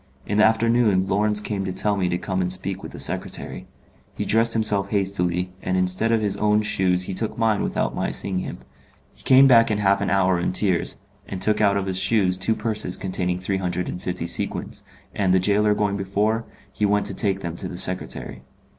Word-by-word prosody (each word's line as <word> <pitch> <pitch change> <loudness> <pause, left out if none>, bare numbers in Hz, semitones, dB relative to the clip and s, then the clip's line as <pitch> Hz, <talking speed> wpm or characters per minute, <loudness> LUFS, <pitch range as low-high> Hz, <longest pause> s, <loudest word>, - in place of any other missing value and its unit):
In 105 +1 -1
the - - +6
afternoon 110 -3 +2
Lawrence 105 +2 +1
came 105 -2 -3
to 95 - -3
tell 100 +2 0
him 90 -1 0
to 90 - 0
come 95 +1 -3
and 90 0 -1
speak 95 +1 -3
with - - -9
the - - -10
secretary. - - -3 0.5
He - - -3
dressed 115 +2 +2
himself 105 -3 +1
hastily, 90 -3 -1
and 95 - -1
instead 90 +5 0
of 115 -1 +2
his 100 -2 -1
own 105 +1 +2
shoes 90 -3 +1
he 95 - -3
took 110 +3 -3
mine 110 -2 +1
without - - -1
my - - -2
seeing 95 -2 -2
him. - - -6 0.6
He - - -17
came 130 +1 +6
back 115 -4 +6
in 105 - 0
half 100 -1 +2
an 100 - -1
hour 95 -2 +2
in 85 - -1
tears, 95 -3 0 0.3
and 95 - -6
took 105 +2 +1
out 100 -1 +3
of 100 - -2
his 95 -1 -2
shoes 95 -1 +2
two 95 +4 0
purses 110 -2 0
containing 90 -2 -2
three 95 +1 -2
hundred 90 -1 -2
and 90 - -6
fifty 90 -2 -4
sequins, 85 - -1 0.3
and, 95 -2 +1
the - - +4
gaoler 105 +2 +2
going 100 -1 0
before, 105 +4 -1 0.3
he - - -4
went 105 0 +2
to - - -1
take 100 -2 0
them 85 -2 -5
to - - 0
the 90 - -7
secretary. 90 0 -3
100 Hz, 215 wpm, -23 LUFS, 90-105 Hz, 0.6 s, the